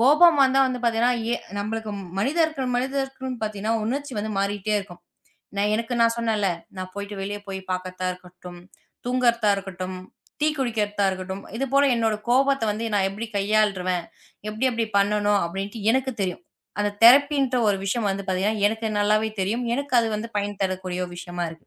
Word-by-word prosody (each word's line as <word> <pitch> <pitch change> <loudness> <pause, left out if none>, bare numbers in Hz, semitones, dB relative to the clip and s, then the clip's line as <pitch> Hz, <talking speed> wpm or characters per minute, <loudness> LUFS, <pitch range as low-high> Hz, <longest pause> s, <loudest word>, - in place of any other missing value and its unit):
கோபம் 300 +5 +6
வந்தா 270 0 +4
வந்து 255 -1 -2
பாத்தீங்கன்னா, 235 +1 +3 0.2
எ - - +3 0.2
நம்மளுக்கு 220 +1 -3 0.3
மனிதர் 315 +9 +2 0.2
மனிதருக்கு 265 +1 -2
பாத்தீங்கன்னா 215 +1 -1
உணர்ச்சி 275 +3 -3
வந்து 215 +1 -2
மாறிட்டே 205 +1 -1
இருக்கும். 180 -3 -9 0.6
நான் 205 +1 +2
எனக்கு 230 +2 -2
நான் 230 0 +4
சொன்னேன்ல. 220 -4 +1 0.3
நான் 185 0 -5
போயிட்டு 200 0 -6
வெளிய 205 +1 -3
போய்ப் 190 -1 -6
பாக்கத்தா 185 0 -4
இருக்கட்டும், 180 -1 -12 0.5
தூங்கறதா 240 -3 +2
இருக்கட்டும், 185 -1 -5 0.5
டீ 305 - +5
குடிக்கறதா 210 -5 0
இருக்கட்டும். 190 +1 -5 0.2
இது 275 - 0
போல 280 0 +6
என்னோட 225 -2 +1
கோபத்த 270 0 +3
வந்து 225 +2 -3
நான் 195 -1 +2
எப்படி 220 +3 -6
கையாள்றுவன், 195 -4 +1 0.5
எப்படி 220 +5 0
எப்படி 230 -1 0
பண்ணணும் 205 0 +2
அப்படின்ட்டு 195 +5 -5
எனக்குத் 260 -4 -1
தெரியும். 185 - -3 0.4
அந்த 205 0 +1
தெரப்பின்ற 275 +1 +6
ஒரு 200 - +2
விஷயம் 205 +1 0
வந்து 195 0 -3
பாத்தீங்கன்னா, 200 +3 0
எனக்கு 220 +1 -3
நல்லாவே 215 +1 +2
தெரியும். 225 +6 -1
எனக்கு 280 0 -3
அது 230 - 0
வந்து 230 +2 -5
பயன் 205 -1 -3
தரக்கூடிய 185 -1 -2
விஷயமா 175 0 -4
இருக்கு. 160 -1 -14
210 Hz, 160 wpm, -24 LUFS, 195-245 Hz, 0.6 s, கோபம்